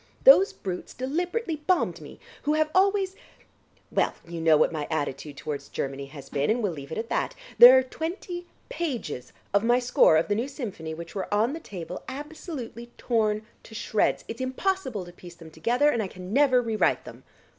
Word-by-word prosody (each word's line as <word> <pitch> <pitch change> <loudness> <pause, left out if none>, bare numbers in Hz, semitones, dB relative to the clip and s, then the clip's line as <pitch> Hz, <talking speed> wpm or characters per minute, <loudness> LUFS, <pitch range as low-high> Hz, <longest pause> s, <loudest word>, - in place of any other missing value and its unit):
Those 455 -6 +8
brutes 180 -2 -6
deliberately 340 - -2
bombed 340 +4 0
me, - - -11 0.2
who 295 - +1
have 310 0 +1
always... 385 0 +2 0.8
well, - - +1
you 170 -1 -5
know 160 -1 +5
what 155 - +3
my 150 -3 -3
attitude 145 -2 -3
towards 145 -1 -5
Germany 140 0 -4
has 140 -1 -11
been, 140 0 -1
and 230 +2 +1
we'll 200 - +1
leave 140 -3 -9
it - - -4
at 225 +1 -4
that. - - -1 0.2
There 250 +2 +11
are 260 - +4
twenty 350 +5 -5 0.2
pages 250 - -4 0.2
of 200 +1 +3
my 240 +1 +4
score 245 -10 +4
of 160 - +1
the 205 - +1
new 230 +5 -1
symphony 200 - -6
which 165 0 -9
were 195 -2 -4
on 220 +6 +2
the 325 - -5
table, 180 - -7
absolutely 275 -4 -7
torn 215 -3 0 0.2
to 220 - -13
shreds. 215 -1 0
It's 230 +2 -6
impossible 260 - -2
to 175 - -12
piece 175 -1 -12
them 165 -1 -13
together, 245 - +2
and 235 - 0
I 200 - -2
can 185 +1 -9
never 260 -2 +4
re 225 -2 -2
write - - +2
them." - - -11
230 Hz, 195 wpm, -26 LUFS, -, 0.8 s, There